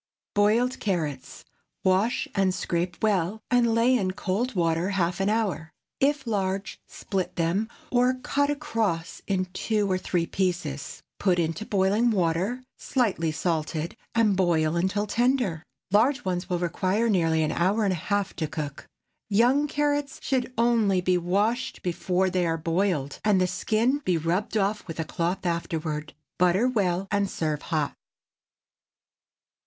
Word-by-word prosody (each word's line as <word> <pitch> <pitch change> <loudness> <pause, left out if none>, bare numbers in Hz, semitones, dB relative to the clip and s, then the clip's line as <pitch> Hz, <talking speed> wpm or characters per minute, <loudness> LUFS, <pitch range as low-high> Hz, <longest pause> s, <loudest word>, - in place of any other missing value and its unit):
BOILED 225 +5 +2
CARROTS. 155 -9 -3 0.4
Wash 190 +5 +2
and 195 -2 +2
scrape 175 0 -2
well, 200 -1 +1
and 235 -2 +3
lay 240 +3 +4
in 195 -6 +1
cold 210 +6 -2
water 170 +1 +1
half 180 -2 0
an 195 +1 +1
hour. 195 -8 -1 0.3
If 285 0 +2
large, 195 -2 -2
split 185 -2 -4
them, 175 +6 0 0.2
or 250 +1 +3
cut 285 +2 0
across 225 - -2
in 185 -2 +1
two 210 -1 0
or 185 - +1
three 175 -2 0
pieces. 175 -7 -3 0.2
Put 185 -3 +2
into 170 +5 -1
boiling 205 +4 +2
water, 190 +5 0 0.2
slightly 200 - 0
salted, 160 0 -2 0.2
and 220 -4 +4
boil 170 -4 +2
until 190 +4 0
tender. 240 - +1 0.3
Large 255 +7 +3
ones 180 0 -2
will 180 - +1
require 185 +6 0
nearly 165 -6 +2
an 155 - 0
hour 195 +6 +1
and 195 -2 +2
a 165 - -6
half 200 -1 0
to 160 - -1
cook. 145 -2 -6 0.4
Young 245 +8 +3
carrots 290 -1 -1
should 260 -2 0
only 225 -5 +3
be 180 0 +2
washed 205 +8 0
before 180 +1 0
they 180 -2 +1
are 165 0 0
boiled, 165 -3 -1
and 210 -3 +4
the 185 - +3
skin 230 +9 +1
be 185 - 0
rubbed 175 +7 -1
off 210 0 0
with 165 -1 -7
a 160 - -1
cloth 180 +4 -2
afterward. 160 -3 -2 0.2
Butter 180 +7 +4
well, 195 -6 0
and 200 -1 +1
serve 155 -4 -2
hot. 155 -4 -1
190 Hz, 150 wpm, -26 LUFS, 170-220 Hz, 0.4 s, lay